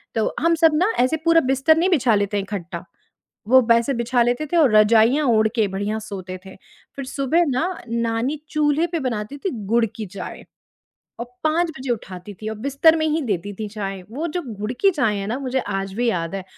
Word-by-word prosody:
तो 225 - 0
हम 335 +1 +3
सब 325 0 +4
ना, 370 +8 +2
ऐसे 255 +6 +2
पूरा 330 0 +5
बिस्तर 270 +4 +3
नहीं 350 +3 +2
बिछा 255 - +3
लेते 205 0 0
इकट्ठा, 185 -4 -6 0.6
वो 260 +3 +6
वेसे 235 +4 +3
बिछा 240 0 0
लेते 245 +5 0
थे, - - +4
और 275 -10 +4
रज़ाइयाँ 225 +7 +5
ओढ़ 220 -2 +4
के 220 -3 +2
बढ़िया 205 +3 -3
सोते 190 -4 -7
थे। 190 - -11 0.4
फिर 275 - -5
सुबह 275 +6 +1
ना, 265 +6 0 0.2
नानी 230 +4 -1
चूल्हे 305 +2 +1
पे 340 -1 -3
बनाती 240 -1 -4
थीं 370 +6 -3 0.2
गुड़ 230 +2 +3
की 220 - -5
चाय, 185 -1 -8 0.8
और 235 - -4 0.2
5 330 +3 +2
बजे 265 -1 -5
उठाती 190 -4 -5
थीं 215 - -4
और 220 - -5
बिस्तर 280 +6 +3
में 315 -1 0
ही 310 +1 0
देती 205 -1 -2
थीं 215 - -3
चाय। 195 -3 -5
वो 290 +8 -3
जो 355 +3 -3 0.2
गुड़ 210 +3 -3
की 395 - +5
चाय 255 - 0
है 195 - -4
ना, 240 +4 -2
मुझे 260 -1 -1
आज 195 -3 -4
भी 240 +3 0
याद 165 -3 -3
है। 195 -1 -4
235 Hz, 210 wpm, -21 LUFS, 210-300 Hz, 0.8 s, वो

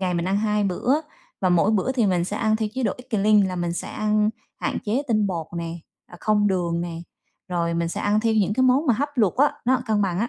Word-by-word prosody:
ngày 180 -2 0
mình 170 0 -1
ăn 195 - +1
2 210 0 +1
bữa, 245 - +1 0.4
và 185 - +2
mỗi 180 +3 +3
bữa 220 +4 +1
thì 240 -5 +2
mình 180 -2 +1
sẽ 205 - -4
ăn 220 0 +1
theo 220 -1 -2
chế 260 - -2
độ 215 -5 +1
eat 255 +1 -14
clean, 210 -1 +4
là 185 -1 -4
mình 175 -1 -1
sẽ 175 - -5
ăn 215 0 +1 0.3
hạn - - -1
chế 225 +7 0
tinh 215 -3 +2
bột 170 -5 -3
nè, 170 0 -4 0.3
à, 175 - -13
không 210 -1 +2
đường 175 -3 0
nè, 170 -1 -4 0.5
rồi 170 -2 -1
mình 170 0 0
sẽ - - -4
ăn 210 +1 +2
theo 225 0 +1
những 205 -2 +2
cái 260 - +2
món 260 +5 +3
mà 245 - +4
hấp, 285 +7 -1
luộc 215 -8 +2
á, 285 +3 +4
nó 255 +1 +2
cân 215 -2 +1
bằng 185 -2 -1
á. 230 +3 0
210 Hz, 270 wpm, -23 LUFS, 180-225 Hz, 0.5 s, clean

